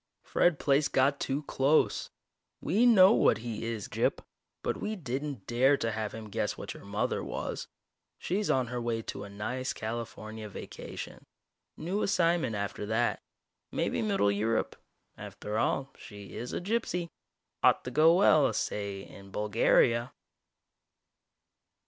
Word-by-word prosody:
Fred 175 Hz, -4 st, +2 dB
Plaice 140 Hz, +1 st, +2 dB
got 135 Hz, +1 st, +2 dB
too 140 Hz, +2 st, -2 dB
close. 140 Hz, +2 st, +2 dB, 0.5 s
We 215 Hz, +10 st, +3 dB
know 200 Hz, -3 st, +8 dB
what 110 Hz, -, +4 dB
he 115 Hz, 0 st, -5 dB
is, 115 Hz, -3 st, -4 dB
Gyp. -, -, 0 dB, 0.4 s
But -, -, -1 dB
we 215 Hz, -, -3 dB
didn't 140 Hz, -, -4 dB
dare 130 Hz, +4 st, +3 dB
to 115 Hz, -, -1 dB
have 110 Hz, -1 st, -3 dB
him 110 Hz, -2 st, -8 dB
guess -, -, -1 dB
what -, -, -6 dB
your -, -, -13 dB
mother -, -, -1 dB
was. -, -, -4 dB, 0.5 s
She's 200 Hz, +4 st, -1 dB
on 130 Hz, -1 st, +3 dB
her 120 Hz, 0 st, -4 dB
way 115 Hz, -1 st, -2 dB
to 100 Hz, -, -6 dB
a -, -, -10 dB
nice 125 Hz, +6 st, -3 dB
California 110 Hz, -1 st, -6 dB
vacation. -, -, -8 dB, 0.5 s
New 190 Hz, +6 st, -2 dB
assignment 170 Hz, -, +2 dB
after 100 Hz, 0 st, -3 dB
that. 115 Hz, +2 st, 0 dB, 0.5 s
Maybe -, -, -1 dB
middle 200 Hz, -, +2 dB
Europe. 110 Hz, +2 st, 0 dB, 0.4 s
After 105 Hz, +1 st, -4 dB
all, 135 Hz, +3 st, 0 dB
she 100 Hz, -4 st, -11 dB
is 120 Hz, -, -5 dB
a -, -, -2 dB
gypsy. 180 Hz, -4 st, -2 dB, 0.5 s
Ought -, -, +4 dB
to 125 Hz, -, -5 dB
go 160 Hz, +5 st, +6 dB
well, 155 Hz, -6 st, +5 dB
say, 100 Hz, -1 st, -3 dB
in 100 Hz, 0 st, -13 dB
Bulgaria!" 115 Hz, +4 st, +2 dB
120 Hz, 145 wpm, -30 LUFS, 110-155 Hz, 0.5 s, know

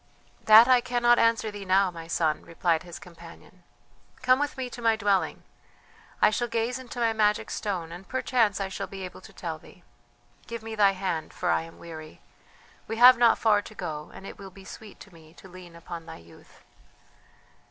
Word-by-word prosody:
"That 220 Hz, +2 st, +9 dB
I 255 Hz, -1 st, +5 dB
cannot 240 Hz, -1 st, +2 dB
answer 230 Hz, -1 st, +2 dB
thee 205 Hz, -1 st, -8 dB
now, 190 Hz, 0 st, +2 dB
my 165 Hz, -1 st, -10 dB
son," 160 Hz, -2 st, 0 dB
replied 165 Hz, -1 st, -1 dB
his 175 Hz, -2 st, -10 dB
companion. 170 Hz, +1 st, -15 dB, 0.6 s
"Come 255 Hz, +1 st, +4 dB
with 290 Hz, -1 st, -2 dB
me 260 Hz, -1 st, -3 dB
to 245 Hz, 0 st, -10 dB
my 225 Hz, -1 st, +3 dB
dwelling; 200 Hz, -3 st, 0 dB, 0.8 s
I -, -, +6 dB
shall 240 Hz, +3 st, -1 dB
gaze 230 Hz, +2 st, -2 dB
into 250 Hz, -1 st, -9 dB
my 230 Hz, -1 st, +2 dB
magic 210 Hz, -1 st, +1 dB
stone 180 Hz, -6 st, -4 dB
and 175 Hz, +3 st, -10 dB
perchance 235 Hz, -6 st, +1 dB
I 195 Hz, -, -2 dB
shall 190 Hz, -, -5 dB
be 195 Hz, -1 st, -7 dB
able 180 Hz, -, -10 dB
to -, -, -14 dB
tell -, -, -6 dB
thee. -, -, -18 dB, 0.6 s
Give 230 Hz, -1 st, -7 dB
me 225 Hz, 0 st, -7 dB
thy 205 Hz, -2 st, +4 dB
hand, 185 Hz, -4 st, -4 dB
for 175 Hz, -, -1 dB
I -, -, +2 dB
am 165 Hz, 0 st, -12 dB
weary; 155 Hz, -2 st, -11 dB, 0.7 s
we 225 Hz, -, -4 dB
have 250 Hz, +1 st, +8 dB
not 235 Hz, -1 st, +5 dB
far 210 Hz, -2 st, +3 dB
to 215 Hz, -, -13 dB
go, 155 Hz, -5 st, -6 dB
and 195 Hz, -, -12 dB
it -, -, -10 dB
will 195 Hz, -1 st, -9 dB
be 190 Hz, +1 st, -15 dB
sweet 215 Hz, +1 st, -12 dB
to 195 Hz, -, -14 dB
me 160 Hz, 0 st, -18 dB
to 190 Hz, -, -14 dB
lean 180 Hz, -2 st, -13 dB
upon 170 Hz, 0 st, -9 dB
thy -, -, -9 dB
youth." 85 Hz, 0 st, -19 dB
200 Hz, 200 wpm, -26 LUFS, 175-230 Hz, 0.8 s, That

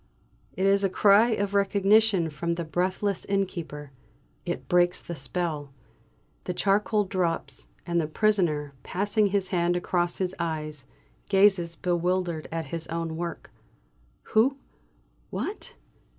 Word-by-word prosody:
It 190 Hz, -, -1 dB
is 200 Hz, 0 st, +3 dB
a 195 Hz, -, +3 dB
cry 205 Hz, +4 st, +5 dB
of 205 Hz, -3 st, -1 dB
recognition 200 Hz, -2 st, +3 dB
from 170 Hz, +3 st, -2 dB
the 170 Hz, -, -3 dB
breathless 185 Hz, +4 st, -1 dB
innkeeper. 170 Hz, -7 st, -3 dB, 0.6 s
It -, -, -4 dB
breaks 175 Hz, 0 st, +3 dB
the 170 Hz, -, -7 dB
spell. 150 Hz, 0 st, -3 dB, 0.7 s
The 180 Hz, -, -3 dB
charcoal 210 Hz, +2 st, +2 dB
drops, 185 Hz, -4 st, 0 dB, 0.2 s
and 170 Hz, -1 st, +1 dB
the 155 Hz, -, -2 dB
prisoner, 160 Hz, -6 st, +1 dB
passing 205 Hz, -, +1 dB
his 195 Hz, -1 st, 0 dB
hand 175 Hz, -1 st, +1 dB
across 175 Hz, -1 st, -1 dB
his 185 Hz, -1 st, -1 dB
eyes, 155 Hz, -4 st, -4 dB, 0.4 s
gazes 190 Hz, -4 st, +3 dB
bewildered 175 Hz, -1 st, -1 dB
at 165 Hz, 0 st, -3 dB
his 165 Hz, -1 st, -3 dB
own 165 Hz, -1 st, -3 dB
work. 170 Hz, +1 st, -5 dB, 0.8 s
"Who? 260 Hz, +6 st, +4 dB, 0.7 s
What?" 415 Hz, -, -5 dB
180 Hz, 125 wpm, -27 LUFS, 165-200 Hz, 0.8 s, cry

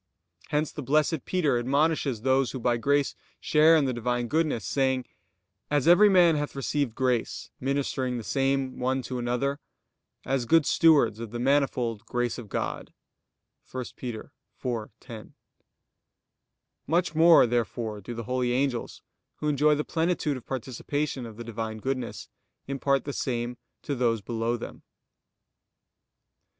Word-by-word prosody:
Hence 150 Hz, +1 st, 0 dB
the -, -, -6 dB
Blessed 150 Hz, +2 st, +1 dB
Peter 150 Hz, -9 st, +1 dB
admonishes 140 Hz, -2 st, +1 dB
those 130 Hz, 0 st, +2 dB
who 130 Hz, -, -4 dB
by 120 Hz, 0 st, +1 dB
grace 140 Hz, +3 st, +1 dB, 0.3 s
share 155 Hz, +2 st, +5 dB
in 155 Hz, -3 st, +3 dB
the 130 Hz, -, 0 dB
Divine 120 Hz, 0 st, -1 dB
goodness; 155 Hz, -8 st, 0 dB
saying: 130 Hz, -2 st, 0 dB, 0.6 s
"As 145 Hz, 0 st, +1 dB
every 200 Hz, +5 st, +7 dB
man 175 Hz, -4 st, +5 dB
hath 145 Hz, -1 st, -3 dB
received 140 Hz, -3 st, -1 dB
grace, 125 Hz, -3 st, -1 dB
ministering 130 Hz, -2 st, -1 dB
the 115 Hz, -, -5 dB
same 135 Hz, +1 st, 0 dB
one 130 Hz, +1 st, 0 dB
to 125 Hz, -1 st, -4 dB
another; 125 Hz, +4 st, -1 dB, 0.7 s
as 130 Hz, -3 st, -1 dB
good 165 Hz, +1 st, +5 dB
stewards 145 Hz, -10 st, +4 dB
of 115 Hz, -1 st, -6 dB
the 120 Hz, -, -5 dB
manifold 125 Hz, -4 st, +1 dB
grace 120 Hz, 0 st, -1 dB
of 110 Hz, -4 st, -10 dB
God" -, -, -4 dB, 0.8 s
(1 130 Hz, -1 st, -4 dB
Pet. 120 Hz, -4 st, -6 dB, 0.3 s
4:10). 115 Hz, -2 st, -6 dB, 1.5 s
Much 170 Hz, +1 st, +1 dB
more 165 Hz, -1 st, +7 dB
therefore 115 Hz, -2 st, -2 dB
do 120 Hz, +5 st, -7 dB
the 115 Hz, -, -5 dB
holy 125 Hz, +1 st, 0 dB
angels, 130 Hz, -2 st, -2 dB, 0.3 s
who 150 Hz, -, -4 dB
enjoy 150 Hz, +1 st, +3 dB
the 150 Hz, -, -1 dB
plenitude 165 Hz, -3 st, 0 dB
of 130 Hz, -, -10 dB
participation 130 Hz, +1 st, -3 dB
of 110 Hz, -2 st, -11 dB
the 120 Hz, -, -6 dB
Divine 110 Hz, -1 st, -5 dB
goodness, 130 Hz, +1 st, -4 dB, 0.4 s
impart 140 Hz, 0 st, 0 dB
the 145 Hz, -, -4 dB
same 120 Hz, -2 st, -2 dB, 0.3 s
to 145 Hz, -, -2 dB
those 120 Hz, -4 st, +1 dB
below 115 Hz, +2 st, -2 dB
them. -, -, -9 dB
130 Hz, 140 wpm, -27 LUFS, 120-145 Hz, 1.5 s, every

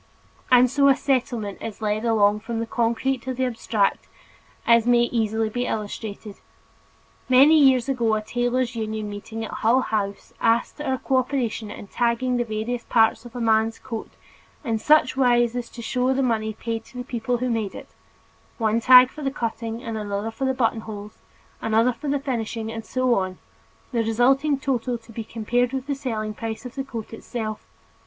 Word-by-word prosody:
And 250 Hz, 0 st, +7 dB
so 280 Hz, +2 st, +3 dB
a 275 Hz, -, +6 dB
Settlement 245 Hz, -7 st, -1 dB
is 220 Hz, -2 st, -6 dB
led 215 Hz, +1 st, -1 dB
along 210 Hz, -2 st, +3 dB
from 225 Hz, +1 st, -5 dB
the 230 Hz, -, -1 dB
concrete 235 Hz, +3 st, 0 dB
to 260 Hz, +1 st, -4 dB
the 260 Hz, +1 st, 0 dB
abstract, 225 Hz, -4 st, 0 dB, 0.6 s
as 235 Hz, 0 st, +4 dB
may 240 Hz, -1 st, +5 dB
easily 225 Hz, -2 st, 0 dB
be 245 Hz, +3 st, -2 dB
illustrated. 210 Hz, -1 st, -5 dB, 0.9 s
Many 280 Hz, +5 st, +7 dB
years 265 Hz, -3 st, +5 dB
ago 235 Hz, -5 st, +1 dB
a 215 Hz, -, -1 dB
tailors' 245 Hz, +1 st, -1 dB
union 215 Hz, -2 st, -3 dB
meeting 220 Hz, +2 st, -6 dB
at -, -, -8 dB
Hull 240 Hz, +4 st, +2 dB
House 200 Hz, -4 st, -3 dB
asked 230 Hz, +6 st, +1 dB
our 265 Hz, -3 st, -1 dB
cooperation 250 Hz, -5 st, -1 dB
in -, -, -8 dB
tagging 240 Hz, +3 st, 0 dB
the 240 Hz, -, +1 dB
various 230 Hz, +2 st, -3 dB
parts 225 Hz, +1 st, +2 dB
of 240 Hz, 0 st, -12 dB
a -, -, -4 dB
man's 225 Hz, -1 st, +2 dB
coat 230 Hz, -4 st, -6 dB, 0.5 s
in 225 Hz, -5 st, -1 dB
such 300 Hz, +1 st, +4 dB
wise 240 Hz, -2 st, +3 dB
as 245 Hz, -1 st, -4 dB
to 235 Hz, -, -9 dB
show 255 Hz, +2 st, +1 dB
the 270 Hz, -, +1 dB
money 220 Hz, -3 st, 0 dB
paid 225 Hz, +1 st, -4 dB
to 250 Hz, -, -13 dB
the 250 Hz, -, -3 dB
people 245 Hz, 0 st, -2 dB
who 250 Hz, -, -2 dB
had 245 Hz, -, 0 dB
made 215 Hz, -4 st, -2 dB
it; -, -, -10 dB, 0.7 s
one 225 Hz, -1 st, +1 dB
tag 255 Hz, +1 st, +8 dB
for 305 Hz, -, -10 dB
the 275 Hz, -, 0 dB
cutting 230 Hz, -2 st, -4 dB
and 225 Hz, -3 st, -4 dB
another 205 Hz, +1 st, -3 dB
for 270 Hz, -, -3 dB
the 265 Hz, 0 st, +1 dB
buttonholes, 220 Hz, -4 st, -3 dB, 0.4 s
another 225 Hz, +3 st, +2 dB
for 290 Hz, -, -8 dB
the 285 Hz, 0 st, +1 dB
finishing 230 Hz, -5 st, -3 dB
and 225 Hz, -1 st, -6 dB
so 255 Hz, -1 st, +1 dB
on, 185 Hz, -4 st, -1 dB, 0.5 s
the 235 Hz, -3 st, +1 dB
resulting 265 Hz, +6 st, +2 dB
total 250 Hz, -2 st, -1 dB
to 230 Hz, 0 st, -17 dB
be 225 Hz, 0 st, -5 dB
compared 240 Hz, +3 st, 0 dB
with 265 Hz, -1 st, -3 dB
the 285 Hz, -, -1 dB
selling 225 Hz, -6 st, -3 dB
price 225 Hz, +2 st, -6 dB
of 250 Hz, -, -7 dB
the 270 Hz, -, -3 dB
coat 230 Hz, -5 st, -7 dB
itself. 220 Hz, -2 st, -5 dB
235 Hz, 185 wpm, -24 LUFS, 220-255 Hz, 0.9 s, tag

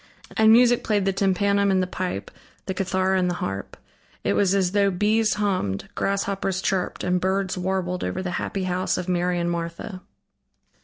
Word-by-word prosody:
And 220 Hz, 0 st, +6 dB
music 240 Hz, +1 st, +5 dB
played 205 Hz, -3 st, +1 dB
the 195 Hz, -, +1 dB
tympanum 200 Hz, +1 st, +2 dB
and 190 Hz, -1 st, +3 dB
the -, -, 0 dB
pipe, 180 Hz, -, -4 dB, 0.3 s
the 190 Hz, -, -2 dB
cithara 190 Hz, 0 st, +1 dB
and 180 Hz, -1 st, +1 dB
the 175 Hz, -, -1 dB
harp. 95 Hz, -, -5 dB, 0.5 s
It -, -, +1 dB
was 195 Hz, -1 st, +2 dB
as 185 Hz, -2 st, +2 dB
though 200 Hz, 0 st, +3 dB
bees 210 Hz, +4 st, +2 dB
hummed, 185 Hz, -, -1 dB
grasshoppers 195 Hz, -1 st, -1 dB
chirped 190 Hz, -1 st, -1 dB
and 180 Hz, 0 st, +1 dB
birds 190 Hz, 0 st, 0 dB
warbled 180 Hz, 0 st, -2 dB
over 185 Hz, -, -3 dB
the 180 Hz, -, -3 dB
happy 195 Hz, -, -3 dB
house 185 Hz, 0 st, 0 dB
of 180 Hz, 0 st, -4 dB
Mary 180 Hz, 0 st, 0 dB
and 170 Hz, 0 st, 0 dB
Martha. 170 Hz, +3 st, -5 dB
190 Hz, 175 wpm, -24 LUFS, 180-200 Hz, 0.5 s, And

